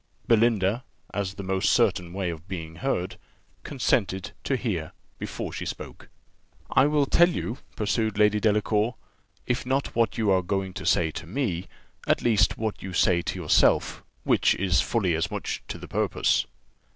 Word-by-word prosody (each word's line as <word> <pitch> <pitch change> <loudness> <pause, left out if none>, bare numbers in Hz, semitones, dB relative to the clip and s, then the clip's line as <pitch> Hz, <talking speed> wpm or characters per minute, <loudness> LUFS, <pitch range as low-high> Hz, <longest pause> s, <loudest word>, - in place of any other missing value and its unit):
Belinda, 115 -1 +3 0.3
as 95 -1 -2
the 100 - -6
most 95 0 +1
certain 90 -1 +2
way 95 -1 -2
of 85 +2 -10
being 80 -4 -6
heard, 90 -4 -2 0.4
consented 95 - 0
to 135 - 0
hear 95 -11 -3 0.3
before - - -5
she - - -4
spoke. - - -7 0.6
"I 140 - +5
will 150 -1 +2
tell 175 +5 +5
you," 125 -7 -4 0.2
pursued 110 0 0
Lady 105 0 +4
Delacour, 105 +2 +1 0.5
"if 125 0 -1
not 135 +2 -1
what 115 0 +1
you 110 -3 +2
are 95 -1 +4
going 95 +1 -2
to - - -5
say 80 -2 +3
to 80 +2 -7
me, 95 -5 -2 0.4
at - - +2
least 105 -4 +3
what 110 -1 -3
you 95 -1 -6
say 85 0 +3
to 90 - -4
yourself, 80 -4 +3 0.2
which - - +3
is 90 -5 +2
fully 100 -7 0
as 80 0 0
much - - -4
to - - -5
the - - -10
purpose. - - +1
100 Hz, 165 wpm, -26 LUFS, 90-115 Hz, 0.6 s, I